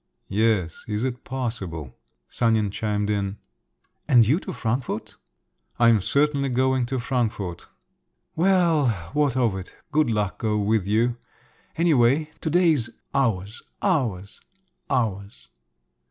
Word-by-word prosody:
"Yes… 100 -5 0
is 105 +1 -2
it 125 -1 -3
possible?" 100 - -5 0.3
Sanin 110 - +1
chimed 105 0 -1
in. 100 -1 -2 0.7
"And 125 -6 +6
you 145 - +3
to - - -7
Frankfort?" 125 0 -3 0.6
"I 120 -1 +5
am 110 -3 +4
certainly 140 +4 +1
going 130 0 +1
to 130 0 -2
Frankfort." 110 - -2 0.7
"Well, 170 -5 +3 0.3
what 145 -4 +1
of 115 -6 +2
it? 95 -1 -8 0.2
Good 150 -3 +2
luck 105 -4 -1
go 110 -1 0
with 105 -1 +1
you! 115 +3 +1 0.6
Anyway, 155 -2 +3
to 160 - -1
day's 160 -8 +3 0.2
ours… 110 -5 0 0.2
ours… 115 - -1 0.5
ours!" 105 -6 -2
120 Hz, 120 wpm, -24 LUFS, 105-135 Hz, 0.7 s, And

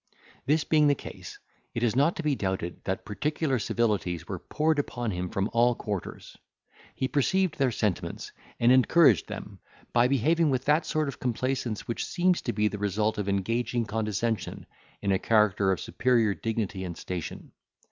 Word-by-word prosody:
This 150 +2 +3
being 150 -2 +4
the 145 - +4
case, - - -9 0.4
it 115 - -1
is 115 -2 +2
not 145 +6 +3
to 170 - -4
be 150 -2 +2
doubted 95 -7 -3
that 95 - -2
particular 145 +4 -1
civilities 100 -7 -1
were 95 -3 -4
poured 155 - 0
upon 120 -5 -2
him 90 -1 -3
from 95 +3 -1
all 120 +1 +4
quarters. 100 -5 -6 0.6
He 130 - -1
perceived 180 +7 +1
their 135 -2 +3
sentiments, 105 -5 -2 0.3
and 120 +1 +5
encouraged 130 - +5
them, - - -8 0.3
by 120 +1 +5
behaving 155 +5 +2
with 130 -1 0
that 150 +3 +2
sort 155 -1 0
of 140 - -6
complaisance 125 -2 -2
which 115 - -2
seems 180 0 +1
to - - -2
be 105 +1 +1
the 105 -1 -4
result 105 +2 0
of 100 -1 -2
engaging 115 +4 0
condescension 110 +1 -2 0.4
in 100 - +1
a 95 - +2
character 105 -3 +3
of 95 - 0
superior 115 -1 +2
dignity 110 -4 -3
and 85 -2 -6
station. 90 -3 -6
115 Hz, 170 wpm, -27 LUFS, 100-140 Hz, 0.6 s, and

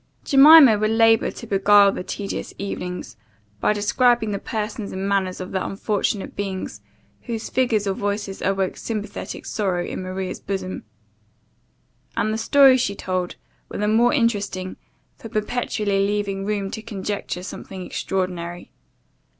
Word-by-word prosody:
Jemima 275 -5 +8
would 215 0 +1
labour 225 0 +4
to - - -9
beguile 200 -1 +5
the 180 - -5
tedious 200 +1 -5
evenings, 180 - -5 0.4
by - - +2
describing 220 +2 +2
the 200 - -2
persons 215 -1 -4
and 190 +1 -3
manners 190 -2 0
of 185 - -6
the 190 -1 -1
unfortunate 200 0 -2
beings, 195 -2 -4 0.4
whose 230 -2 -5
figures 235 -5 +1
or 195 - 0
voices 205 0 -3
awoke 195 -1 0
sympathetic 215 -2 -5
sorrow 185 -4 -1
in - - -5
Maria's 185 0 -4
bosom; 190 - -5 1.3
and 215 +1 +1
the 220 - -2
stories 265 +2 +6
she 200 -4 -1
told 185 -2 -3 0.3
were - - -6
the 210 - 0
more 230 +3 +4
interesting, 205 -7 -1 0.4
for 225 - -10
perpetually 210 -2 -1
leaving 200 -1 -2
room 200 -2 -2
to 220 - -5
conjecture 200 -4 -4
something 190 -1 -8
extraordinary. 175 -3 -4
205 Hz, 140 wpm, -22 LUFS, 190-220 Hz, 1.3 s, Jemima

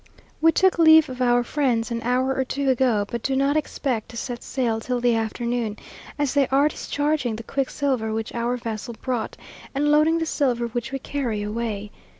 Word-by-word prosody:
We 325 +1 +6
took 370 +1 +3
leave 315 -2 +7
of 255 0 -6
our 245 -1 +3
friends 245 -4 0
an 230 0 -2
hour 255 +3 +1
or 265 - 0
two 270 +1 0
ago, 240 -5 +2
but 235 +2 -4
do 270 +2 -1
not 275 +2 +2
expect 265 -6 -2
to 235 - -9
set 240 0 -4
sail 235 -4 -1
till 250 +2 -2
the 240 0 +3
afternoon, 225 0 -2 0.4
as 290 -3 0
they 280 -2 +3
are 275 +2 +3
discharging 290 -6 -1
the 230 - -7
quicksilver 265 -3 -1
which 220 0 -3
our 240 +1 -1
vessel 230 0 -5
brought, 245 -4 -3 0.4
and 295 +2 +2
loading 305 +2 +4
the 325 - -1
silver 250 -6 0
which 235 +2 -4
we 270 - -2
carry 250 -6 -3
away. 210 -1 -3
250 Hz, 190 wpm, -24 LUFS, 230-280 Hz, 0.4 s, leave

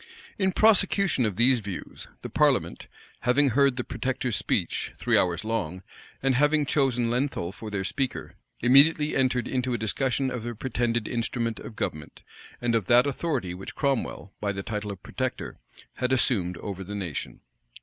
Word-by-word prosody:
In 190 -1 +2
prosecution 195 - +3
of 100 - -3
these 125 +4 +5
views, 100 -3 -7 0.2
the - - -5
parliament, - - +1 0.3
having 135 +3 +3
heard 140 +1 +3
the 125 - -1
protector's 130 -3 -2
speech, - - -1
three - - +1
hours 90 0 +2
long,[*] 95 -5 -2 0.4
and 135 -1 +3
having 150 +3 +3
chosen 125 -5 +1
Lenthal 125 -8 -1
for 110 +2 -8
their 100 -2 -2
speaker, 130 +6 -3 0.3
immediately 150 +4 +5
entered 125 -2 +1
into 125 -1 -1
a - - -1
discussion 130 +4 0
of 125 - -4
the 120 +1 -5
pretended 120 -1 -1
instrument 115 -1 -2
of 110 - -9
government, 75 -5 -5 0.4
and 120 -1 0
of 110 -5 +1
that 120 +1 +6
authority 140 - -2
which 95 +2 -8
Cromwell, 135 -8 -2
by 100 -1 0
the 95 -1 -5
title 105 -1 -4
of 95 -2 -10
protector, - - -4 0.4
had 125 0 -1
assumed 95 -9 +1
over 95 0 -6
the 100 +2 -6
nation. 90 -7 -5
120 Hz, 165 wpm, -26 LUFS, 105-135 Hz, 0.4 s, that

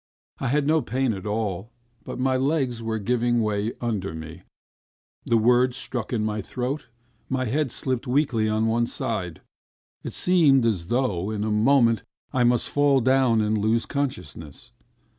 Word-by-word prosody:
I 135 - -2
had 145 +3 +1
no 155 +1 +3
pain 125 0 -1
at 95 +1 -6
all, 105 -1 -2 0.3
but - - -7
my 130 +1 +1
legs 130 -3 0
were 110 -1 -2
giving 120 +2 +1
way 105 +1 -1
under 100 -8 -3
me, 80 +2 -9 0.8
the 115 - +3
words 125 +3 +3
stuck 120 -4 -3
in 110 -3 0
my 105 0 -2
throat, 125 +6 -4 0.4
my 130 -1 -1
head 135 +3 -1
slipped 130 +1 -2
weakly 125 -5 +1
on 110 +1 +1
one 115 +1 +1
side... 100 - -4 0.6
It - - -6
seemed 150 -9 +4
as 95 -7 0
though, 110 -6 0
in 105 -1 -2
a 110 - -1
moment, 115 +1 +3 0.3
I 125 - +2
must 120 0 +2
fall 145 -1 +3
down 130 -2 +3
and 105 0 0
lose 110 +3 +1
consciousness. 120 - -5
120 Hz, 160 wpm, -24 LUFS, 110-130 Hz, 0.8 s, seemed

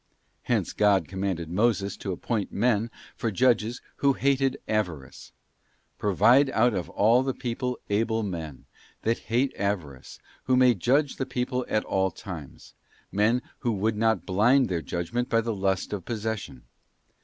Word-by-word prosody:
Hence - - -1
God 100 -2 +3
commanded 95 -3 -3
Moses 100 0 +1
to 95 - -4
appoint 105 +3 -2
men 115 0 +1 0.3
for 115 - -2
judges 120 +1 +1
who 140 -1 +3
hated 135 0 +1
avarice: 85 -11 -3 0.3
' - - -42
Provide 120 +7 +4
out 120 -1 +3
of 90 -3 -3
all 115 +5 +4
the 130 -1 -2
people 125 0 -3
able 110 +2 0
men.... 80 -8 -6 0.4
that 115 +1 +1
hate 125 +4 +1
avarice, 85 -10 -4 0.3
who 130 -1 +3
may 125 -1 +6
judge 135 - +1
the 130 - -2
people 125 0 -2
at 110 - 0
all 95 0 +1
times, 85 -6 -10 0.2
{ - - -33
men 115 +4 +3 0.2
who 120 - 0
would 105 +2 0
not 110 +1 +1
blind 120 +7 +3
their 85 -3 -1
judgment 115 +11 -3
by 115 - +3
the 115 0 -2
lust 95 0 -1
of 100 -3 -4
possession. 110 - -4
110 Hz, 155 wpm, -26 LUFS, 95-125 Hz, 0.4 s, may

